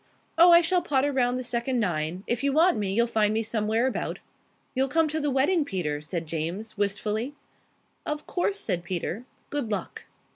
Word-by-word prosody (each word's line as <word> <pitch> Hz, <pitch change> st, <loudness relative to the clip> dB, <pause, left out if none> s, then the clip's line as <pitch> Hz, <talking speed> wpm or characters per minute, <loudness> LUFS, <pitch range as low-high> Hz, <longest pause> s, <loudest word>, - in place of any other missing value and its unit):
Oh, 345 Hz, +2 st, +7 dB
I 340 Hz, 0 st, +8 dB
shall 360 Hz, +1 st, +2 dB
potter 285 Hz, -3 st, +1 dB
round 250 Hz, -2 st, +1 dB
the 255 Hz, -, -3 dB
second 245 Hz, +1 st, -1 dB
nine. 175 Hz, -2 st, -1 dB
If 240 Hz, +2 st, -1 dB
you 280 Hz, -, +2 dB
want 340 Hz, +4 st, +4 dB
me, 200 Hz, -2 st, -1 dB
you'll 235 Hz, +4 st, +3 dB
find 215 Hz, -3 st, +1 dB
me 220 Hz, +1 st, 0 dB
somewhere 220 Hz, +1 st, 0 dB
about." 260 Hz, -, -2 dB, 0.6 s
"You'll 265 Hz, +1 st, +1 dB
come 320 Hz, +3 st, +2 dB
to 310 Hz, +1 st, -1 dB
the 295 Hz, -1 st, 0 dB
wedding, 285 Hz, +6 st, +2 dB
Peter?" 170 Hz, -, -2 dB
said 165 Hz, +2 st, -4 dB
James, 170 Hz, +8 st, -4 dB
wistfully. 210 Hz, +6 st, -1 dB, 0.7 s
"Of 300 Hz, 0 st, -4 dB
course," 390 Hz, +2 st, -1 dB
said 175 Hz, -, -2 dB
Peter. 180 Hz, +5 st, -3 dB, 0.3 s
"Good 285 Hz, -6 st, -2 dB
luck." 210 Hz, -, -4 dB
235 Hz, 185 wpm, -26 LUFS, 200-285 Hz, 0.7 s, I